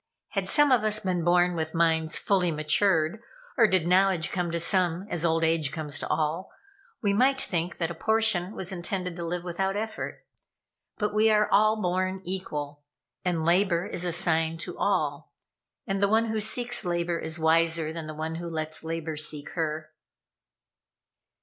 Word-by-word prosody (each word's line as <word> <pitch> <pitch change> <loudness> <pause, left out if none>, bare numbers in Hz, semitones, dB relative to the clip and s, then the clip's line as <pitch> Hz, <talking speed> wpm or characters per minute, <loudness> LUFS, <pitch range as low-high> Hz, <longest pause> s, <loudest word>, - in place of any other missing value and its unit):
Had - - -2
some 295 -2 +4
of 245 -4 +4
us 215 0 +1
been 180 -4 -1
born 175 +1 +3
with 160 0 -3
minds 160 -1 +2
fully 185 -3 +1
matured, 160 +4 +1 0.3
or 230 -4 +5
did 185 -4 +2
knowledge 180 -2 +3
come 180 -2 -1
to 170 0 -2
some 180 +1 +1
as 170 -2 -1
old 165 -1 +1
age 160 -3 +2
comes 150 -1 -3
to - - -4
all, 160 +4 -1 0.5
we 200 -1 +2
might 265 +5 +3
think 175 -6 -2
that 170 -1 -1
a - - -4
portion 220 0 +1
was 185 0 -4
intended 180 0 -4
to 170 - -6
live 175 +1 -3
without 190 +2 -2
effort. 220 +1 -5 0.7
But 210 -1 -1
we 215 +1 +4
are 210 -1 +3
all 215 +2 +4
born 185 0 -1
equal, 150 -6 -5 0.4
and 170 -3 -1
labor 175 0 +2
is 175 - -3
assigned 165 -2 +1
to - - -5
all; - - -1 0.5
and 195 0 -2
the 200 - +4
one 220 +2 +3
who 220 0 -1
seeks 240 +2 +1
labor 175 -1 -1
is 160 +1 -2
wiser 165 0 +2
than 165 -2 -6
the 155 - -7
one 160 +1 -4
who 170 - -5
lets 155 -1 -4
labor 160 -1 -4
seek 150 -1 -2
her." 155 -2 -3
175 Hz, 175 wpm, -27 LUFS, 160-195 Hz, 0.7 s, or